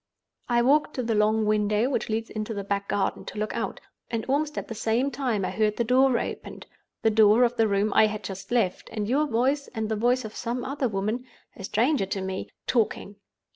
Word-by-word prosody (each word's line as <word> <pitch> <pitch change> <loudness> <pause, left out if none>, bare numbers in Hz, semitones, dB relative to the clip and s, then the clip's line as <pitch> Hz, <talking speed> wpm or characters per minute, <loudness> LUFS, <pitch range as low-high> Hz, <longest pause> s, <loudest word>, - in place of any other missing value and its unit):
"I 240 0 +3
walked 295 +4 +3
to 255 - -1
the 230 -1 0
long 215 +1 +2
window 210 +2 +2
which - - -1
leads 225 +1 -2
into 215 +1 -4
the 200 - -3
back 200 0 -2
garden, 200 - -1
to - - -8
look 215 +1 -2
out, - - -3 0.3
and 230 -1 -2
almost 295 +3 0
at - - -3
the 230 - -5
same 230 +5 0
time 245 -7 -1
I - - -2
heard 215 -1 0
the 235 - +2
door 255 +1 +4
opened—the 225 - -5
door 215 +2 +6
of 245 0 +2
the 225 -2 +3
room 200 0 +1
I 220 - +6
had 210 0 -5
just 195 -1 -7
left, 225 -7 0
and 210 -2 -3
your 290 +6 +2
voice 270 +4 +1
and 220 -1 -2
the 220 - 0
voice 245 +3 +1
of 215 - -8
some 240 +1 -3
other 275 0 -1
woman, 215 +5 -2 0.3
a 195 - -10
stranger 235 +2 +1
to 195 0 -3
me, 190 0 -4 0.2
talking. 210 -3 -1
225 Hz, 215 wpm, -26 LUFS, 210-250 Hz, 0.3 s, door